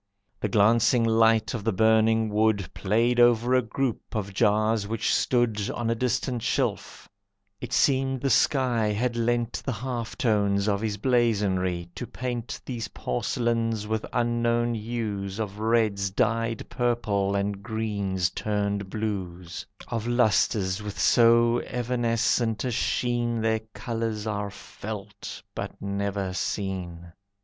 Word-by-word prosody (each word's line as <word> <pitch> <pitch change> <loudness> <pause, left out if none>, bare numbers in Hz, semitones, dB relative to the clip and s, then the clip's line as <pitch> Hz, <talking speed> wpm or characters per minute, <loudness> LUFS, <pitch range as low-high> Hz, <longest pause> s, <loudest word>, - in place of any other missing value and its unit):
The 105 - -1
glancing 115 +4 +4
light 115 0 +3
of 115 - -4
the 115 - +1
burning 110 +2 +3
wood 105 -3 +1
Played 115 +5 +1
over 120 +1 +4
a 130 - +5
group 125 +1 -3
of 100 -2 -3
jars 105 +1 +2
which 110 +1 0
stood 115 -5 +1
On 115 -1 -2
a - - +3
distant 125 +1 -1
shelf, - - -2 0.5
it 125 - -7
seemed 135 +1 +2
the 135 -1 +1
sky 125 -4 +2
Had 120 +3 0
lent 120 0 0
the 135 - -2
half 120 +1 -4
tones 100 -4 +1
of 100 -1 +1
his 105 -2 -2
blazonry 100 -7 +1
To 120 - -6
paint 120 -2 -4
these 115 -4 -4
porcelains 115 - -1
with 110 0 -2
unknown 120 0 +1
hues 105 -4 -3
Of 105 -2 -4
reds 110 -3 +1
dyed 115 +3 0
purple 105 -5 0
and 100 0 -1
greens 100 -5 -1
turned 100 -2 -2
blues, 95 -5 -4 0.2
Of 115 -1 -3
lustres 110 -5 +2
with 105 -1 -6
so 120 0 +5
evanescent 120 -2 0
a 125 - -1
sheen 120 0 0
Their 110 0 +1 0.2
colours 115 -2 -3
are 105 -2 -2
felt, 105 0 -8
but - - -6
never 100 -1 -2
seen. 90 -3 -4
110 Hz, 130 wpm, -26 LUFS, 100-120 Hz, 0.5 s, a